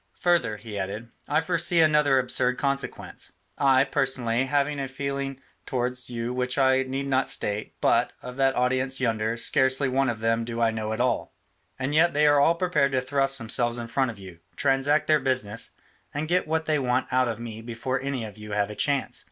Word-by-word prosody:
Further," 170 -12 +2
he 105 -1 -7
added, 105 +5 -5 0.2
"I 150 +2 +2
foresee 170 0 +1
another 150 -3 +4
absurd 125 0 +1
consequence. 140 -1 -3 0.3
I, 135 -2 +5
personally, 130 -3 0
have 140 0 +2
a 140 -2 -3
feeling 135 0 -4 0.3
towards 125 0 -2
you 120 0 -3
which 125 +1 -1
I 130 -1 +4
need 135 +1 -3
not 135 -1 +1
state, 105 +1 -3
but, - - +3
of 125 0 -7
that 135 -1 +2
audience 130 +1 0
yonder, 115 -2 0
scarcely 130 +3 +3
one 135 0 +1
of 115 -2 -3
them 115 +1 +1
do 115 0 -5
I 115 -1 +3
know 110 -1 -3
at 110 - -1
all, 125 - -1 0.4
and 130 +2 -2
yet 165 +1 +4
they 150 +1 +4
are 145 -1 +5
all 165 +4 +4
prepared 170 -6 +1
to 130 - +2
thrust 135 +1 0
themselves 120 0 0
in 120 - -4
front 130 +2 0
of 115 - -7
you, 95 -4 -11 0.2
transact 140 +4 +2
their 155 -1 +4
business, 115 -6 -1 0.5
and 150 +2 -2
get 180 0 +1
what 160 0 0
they 155 -1 +1
want 125 -1 0
out 130 0 +3
of 115 -1 -3
me 115 -2 -7
before 120 +3 -3
any 135 -4 -3
of 105 0 -10
you 105 -1 -7
have 105 0 0
a - - -7
chance. 140 +2 0
130 Hz, 200 wpm, -26 LUFS, 115-140 Hz, 0.5 s, I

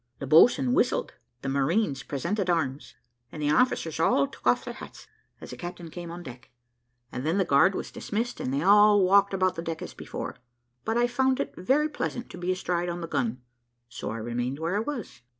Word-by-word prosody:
The - - -5
boatswain 140 - +5
whistled, - - +1 0.3
the 135 - -2
marines 140 +2 +1
presented 180 +9 -2
arms, 150 -5 -1 0.4
and 155 - -8
the 150 0 +1
officers 160 - +1
all 140 -3 +3
took 135 - -8
off 120 - +3
their - - -5
hats - - -11 0.3
as - - -10
the - - -6
captain 175 -1 -7
came 175 0 -7
on 170 +1 -7
the 130 - -7
deck, 125 +2 -17 0.6
and 125 - -5
then 160 +5 0
the 195 - +2
guard 170 +7 +4
was - - -5
dismissed, 230 +3 -3
and 125 - -2
they 140 +3 0
all 205 +1 +6
walked 200 +2 +5
about 185 -1 +1
the 165 - -5
deck 165 -1 -5
as - - -8
before; - - -6 0.5
but 225 - 0
I 240 - +4
found 260 +2 +1
it - - -2
very 270 +11 +2
pleasant 250 -5 -4
to 180 - -9
be 180 +1 -1
astride 175 -1 -1
on 175 0 -4
the 165 - -4
gun, 125 -4 -2 0.5
so - - -6
I 115 - -4
remained 120 +4 -3
where 165 +4 -2
I - - +2
was. 235 - -5
170 Hz, 215 wpm, -27 LUFS, 140-200 Hz, 0.6 s, all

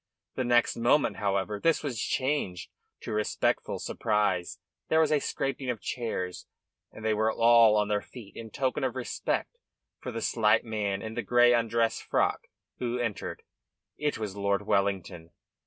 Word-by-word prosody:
The 130 - -2
next 120 0 +3
moment, 120 +5 +2
however, 100 +1 -1
this 165 +7 +2
was 125 -7 -3
changed 130 -10 -1 0.3
to - - -6
respectful 105 0 0
surprise. 105 -5 -1 0.3
There 160 - +4
was 160 -1 +3
a 150 - +4
scraping 135 -2 -3
of 120 -3 -2
chairs 100 -8 -4 0.4
and 110 - -10
they 110 - +3
were 110 +1 +2
all 115 -1 +6
on 105 0 +2
their 105 -1 0
feet 115 -4 -13
in 115 -1 -8
token 130 +4 -1
of 130 -2 -1
respect 130 - -3 0.4
for 125 - -6
the 115 -1 -4
slight 110 0 +3
man 105 -3 -2
in 110 0 -5
the - - -2
grey 120 0 +5
undress 115 -1 +1
frock - - 0 0.3
who 120 0 -1
entered. 115 -4 -4 0.5
It 150 -1 -1
was 105 -3 -5
Lord 100 0 0
Wellington. 95 -5 -1
115 Hz, 160 wpm, -28 LUFS, 105-125 Hz, 0.5 s, all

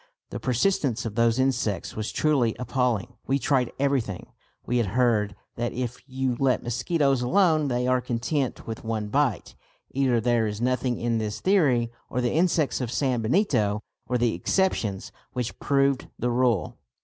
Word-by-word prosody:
The - - -4
persistence 125 - 0
of 110 - -3
those 115 +1 +2
insects 130 -8 0
was 110 0 -3
truly 135 -7 +2
appalling. 125 -2 -1
We 135 - +2
tried 130 -3 +1
everything. 135 -9 -1 0.3
We 125 - 0
had 115 -3 +1
heard 105 -6 +2 0.2
that 120 0 -2
if 125 0 -4
you 130 -1 -1
let 135 -2 +2
mosquitoes 135 +3 +1
alone 155 +2 +3
they 125 -1 0
are 125 0 +2
content 125 +3 -2
with 115 -1 -6
one 110 -2 -2
bite. 130 - 0 0.4
Either 130 -3 +2
there 115 -1 +2
is 105 0 -4
nothing 125 0 0
in 115 -1 0
this 105 -1 -3
theory 135 -12 +2 0.2
or 125 - -2
the 120 -1 0
insects 160 -4 +1
of 125 - -2
San 125 -1 0
Benito 110 - +1 0.2
were 125 - +1
the 120 -1 +1
exceptions 105 - 0 0.2
which 125 -2 -4
proved 140 -2 +1
the 125 - -1
rule. 120 -5 +1
125 Hz, 160 wpm, -26 LUFS, 115-135 Hz, 0.4 s, alone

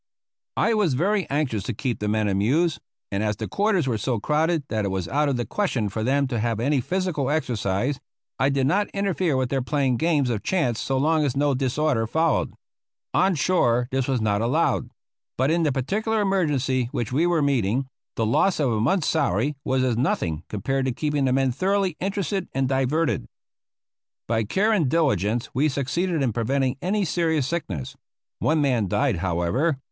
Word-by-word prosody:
I 230 - +3
was 200 -11 +2
very 195 +7 0
anxious 135 -7 0
to 120 - -3
keep 125 +1 -2
the 105 - -2
men 105 0 +1
amused, 130 - +1 0.3
and 100 0 -1
as 105 -1 0
the - - -5
quarters 200 -6 +1
were 115 -4 0
so 120 +1 -1
crowded 155 +5 +1
that 110 -1 -1
it - - 0
was 95 -2 -2
out 145 +1 +1
of 135 - 0
the 120 - -2
question 135 - -1
for 110 +3 -3
them 140 +4 +2
to 120 -3 -1
have 115 0 -1
any 135 +3 +1
physical 175 -3 -1
exercise, 125 -3 -1 0.4
I 135 - +3
did 135 -1 +1
not 200 +9 +1
interfere 185 -7 0
with 130 -1 0
their 135 0 0
playing 135 -1 0
games 150 -5 +1
of 110 -3 -2
chance 145 -12 0
so 135 - -1
long 155 +3 +2
as 135 -2 -1
no 145 0 +2
disorder 130 -2 0
followed. 160 +5 +1 0.6
On 190 +1 +3
shore 125 -7 +2
this 130 -1 0
was 130 -3 +1
not 105 -1 +1
allowed; 135 +9 +1 0.5
but 130 +4 +2
in 170 +1 +2
the 155 -3 +2
particular 210 - -1
emergency 145 - +1
which 120 0 -3
we 160 +6 +2
were 170 -4 +2
meeting, 130 -2 +1 0.3
the 115 - 0
loss 165 - +2
of 140 -5 +2
a 110 -1 0
month's 150 - +1
salary 145 - +1
was 130 -1 +1
as 125 -3 +1
nothing 85 - -1
compared 135 +6 -1
to 130 - 0
keeping 145 +2 -1
the 130 - +2
men 135 0 +2
thoroughly 190 +4 0
interested 195 -1 -2
and 135 -1 +1
diverted. 135 - 0 1.0
By 115 -1 0
care 200 - +1
and 170 -11 +2
diligence 120 - +1
we 145 +5 +2
succeeded 150 +4 -1
in 120 -4 0
preventing 130 +3 0
any 200 +2 0
serious 160 -4 0
sickness. 115 - -4 0.4
One 155 0 +2
man 125 -8 +1
died, 125 +2 +1
however. 90 - 0
135 Hz, 190 wpm, -24 LUFS, 120-160 Hz, 1.0 s, I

